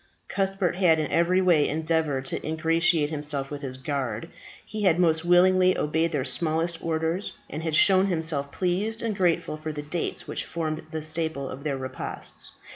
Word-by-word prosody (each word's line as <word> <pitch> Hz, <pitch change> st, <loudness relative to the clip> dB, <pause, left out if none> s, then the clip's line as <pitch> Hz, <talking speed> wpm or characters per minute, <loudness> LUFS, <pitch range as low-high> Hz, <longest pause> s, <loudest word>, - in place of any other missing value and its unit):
Cuthbert 195 Hz, -2 st, -1 dB
had 175 Hz, -4 st, +4 dB
in 155 Hz, -2 st, -2 dB
every 175 Hz, +3 st, +3 dB
way 170 Hz, -5 st, +4 dB
endeavoured 155 Hz, -3 st, 0 dB
to -, -, -2 dB
ingratiate 160 Hz, 0 st, +2 dB
himself 145 Hz, -2 st, -2 dB
with 145 Hz, -1 st, -5 dB
his 130 Hz, -2 st, -5 dB
guard. 130 Hz, -5 st, -3 dB, 0.4 s
He 215 Hz, -, -5 dB
had 180 Hz, -5 st, +4 dB
most 160 Hz, -2 st, +3 dB
willingly 185 Hz, +1 st, +5 dB
obeyed 160 Hz, +2 st, 0 dB
their 140 Hz, -5 st, -1 dB
smallest 165 Hz, +4 st, 0 dB
orders, 165 Hz, +3 st, -1 dB, 0.2 s
had 160 Hz, +1 st, -2 dB
shown 190 Hz, +3 st, +5 dB
himself 160 Hz, -5 st, -1 dB
pleased 200 Hz, +6 st, -1 dB
and 225 Hz, -3 st, -1 dB
grateful 175 Hz, -5 st, +1 dB
for 155 Hz, 0 st, -5 dB
the 150 Hz, -1 st, -6 dB
dates 160 Hz, +3 st, -4 dB
which -, -, -2 dB
formed 160 Hz, -1 st, -4 dB
the 160 Hz, -1 st, -4 dB
staple 155 Hz, -3 st, -1 dB
of 135 Hz, +2 st, -8 dB
their 145 Hz, -3 st, -1 dB
repasts. 130 Hz, 0 st, -5 dB
160 Hz, 170 wpm, -26 LUFS, 150-175 Hz, 0.4 s, willingly